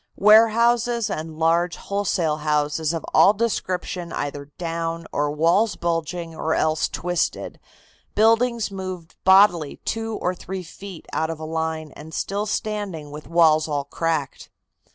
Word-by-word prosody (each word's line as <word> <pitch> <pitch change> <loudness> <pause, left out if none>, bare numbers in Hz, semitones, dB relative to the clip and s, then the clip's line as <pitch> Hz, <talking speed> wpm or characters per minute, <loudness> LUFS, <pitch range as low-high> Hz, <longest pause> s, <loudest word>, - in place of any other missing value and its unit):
Warehouses 230 +2 +4
and 155 0 -5
large 170 +2 +2
wholesale 190 -6 -1
houses 150 0 0
of 165 -1 -4
all 200 - +6
descriptions 185 -5 -2
either 145 0 -4
down, 165 -1 -3
or 145 0 0
walls 170 +9 +2
bulging, 170 0 -3
or 160 0 -1
else 155 0 +1
twisted, 175 0 -2 0.6
buildings 225 0 +3
moved 185 -3 -6
bodily 190 -6 +5
two 225 0 -2
or 180 - -1
three 185 +1 -6
feet 185 +1 -10
out 160 0 0
of 165 -1 -5
a 160 - -6
line 160 -1 -3
and 155 +3 -10
still 205 +2 -2
standing 205 -9 -3
with 150 +1 -9
walls 160 -2 +4
all 145 -2 -1
cracked. 155 0 -3
170 Hz, 135 wpm, -23 LUFS, 155-200 Hz, 0.6 s, all